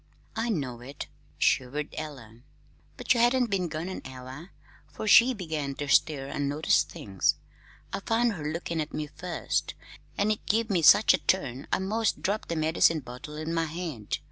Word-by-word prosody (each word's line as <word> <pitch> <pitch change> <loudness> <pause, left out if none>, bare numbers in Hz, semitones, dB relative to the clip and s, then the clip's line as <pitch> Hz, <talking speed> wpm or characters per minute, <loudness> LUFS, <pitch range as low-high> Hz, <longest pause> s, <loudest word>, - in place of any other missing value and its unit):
"I 225 +2 -1
know 135 - -2
it," 135 +3 -7 0.3
shivered 140 +4 0
Ella, 130 -8 -8 0.6
"but - - +2
you 240 - 0
hadn't 240 -1 +3
been 185 -3 0
gone 160 +2 -4
an 190 - -5
hour 130 +6 -9 0.4
'fore 215 - -7
she 240 +4 +8
began 155 -7 -4
to 145 - -4
stir 135 0 +2
an' 140 0 -2
notice 150 +3 +3
things. 95 -2 -1 0.6
I - - -1
found 230 +3 +1
her 150 -5 -4
lookin' 170 0 -3
at 150 - -5
me 155 - -2
first, 175 +4 -3 0.4
an' 205 +1 +2
it 215 - -2
give 220 +1 +1
me 180 -4 +2
such 155 - +7
a - - +1
turn 140 -8 -1
I - - +3
'most 215 +4 -1
dropped 205 +3 -1
the 170 - -1
medicine 160 0 +3
bottle 125 +4 -9
in 155 +2 -4
my 165 -1 +1
hand. 155 - -4
160 Hz, 180 wpm, -28 LUFS, 140-195 Hz, 0.6 s, she